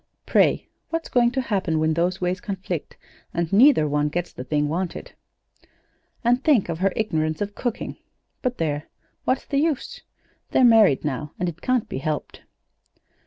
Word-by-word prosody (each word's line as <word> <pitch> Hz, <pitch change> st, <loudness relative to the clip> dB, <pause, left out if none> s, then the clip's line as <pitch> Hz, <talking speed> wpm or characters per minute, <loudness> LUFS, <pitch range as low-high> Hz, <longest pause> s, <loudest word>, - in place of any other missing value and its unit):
Pray, -, -, +3 dB, 0.2 s
what's 330 Hz, 0 st, -3 dB
going 240 Hz, -1 st, +4 dB
to 265 Hz, +2 st, -1 dB
happen 190 Hz, -9 st, -1 dB
when 155 Hz, 0 st, +2 dB
those 175 Hz, +3 st, 0 dB
ways 180 Hz, +1 st, -1 dB
conflict, 190 Hz, -7 st, -5 dB, 0.4 s
and 170 Hz, +1 st, -1 dB
neither 235 Hz, -, +6 dB
one 150 Hz, 0 st, +1 dB
gets 175 Hz, +3 st, -3 dB
the 125 Hz, -, -7 dB
thing 145 Hz, +3 st, 0 dB
wanted? 175 Hz, +3 st, -3 dB, 1.1 s
"And 245 Hz, +2 st, +2 dB
think 270 Hz, -, +3 dB
of 165 Hz, -1 st, -3 dB
her 195 Hz, +1 st, +2 dB
ignorance 155 Hz, -7 st, -1 dB
of 205 Hz, 0 st, -3 dB
cooking 240 Hz, 0 st, -4 dB, 0.4 s
but, 250 Hz, -1 st, -1 dB
there! 150 Hz, -2 st, -2 dB, 0.4 s
What's 255 Hz, 0 st, 0 dB
the 280 Hz, -, 0 dB
use? 305 Hz, -3 st, -1 dB, 0.5 s
They're -, -, +3 dB
married 220 Hz, -, +6 dB
now, 145 Hz, +1 st, -3 dB
and 180 Hz, -, -1 dB
it 165 Hz, -1 st, -6 dB
can't 255 Hz, -3 st, +1 dB
be -, -, -4 dB
helped. 150 Hz, +1 st, -4 dB
185 Hz, 165 wpm, -24 LUFS, 155-240 Hz, 1.1 s, neither